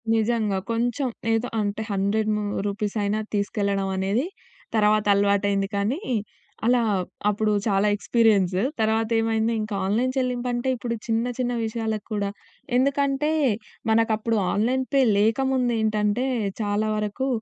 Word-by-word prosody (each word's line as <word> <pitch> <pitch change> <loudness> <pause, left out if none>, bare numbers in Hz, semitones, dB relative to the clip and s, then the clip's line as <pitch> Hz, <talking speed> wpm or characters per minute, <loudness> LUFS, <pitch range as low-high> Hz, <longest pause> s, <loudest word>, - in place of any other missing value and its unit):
నిజంగా. 220 -3 +1
కొంచెం 245 +4 0 0.3
ఏదో 225 +2 0
అంటే 205 +1 -2
100 200 +2 0
ము 210 - -2 0.2
రూపీసైనా 205 +1 -1
తీసుకెళ్లడం 200 -1 0
అనేది 195 +8 0 0.5
తర్వాత 215 0 +3
అలవాటయింది. 200 0 +2
కానీ, 210 - 0 0.7
అలా 245 +1 +4 0.5
అప్పుడు 210 +1 +1 0.2
చాలా 200 0 +2
ఎక్స్‌పి‌‌రి‌యన్సు. 205 -4 +2 0.2
తర్వాతేమైంది 225 +1 +1
ఇంకా 215 -1 -4
ఆన్‌లైన్ 230 +6 +1
చెల్లింపంటే, 250 0 -1
ఇప్పుడు 235 -1 -3
చిన్న, 225 +1 +1
చిన్న 245 -1 0
విషయాలకు 220 -1 -3
కూడా 200 -1 -1 0.5
ఎందుకంటే, 280 +2 +1 0.6
మనకు 225 0 +3
అప్పుడు 225 +1 -1 0.2
ఆన్‌లైన్ 250 +5 +1
పే 275 - +5 0.2
లేకముందేంటంటే, 225 -1 +1 0.4
చాలా 210 +1 0
వరకు 210 +5 -2
220 Hz, 115 wpm, -24 LUFS, 205-240 Hz, 0.7 s, పే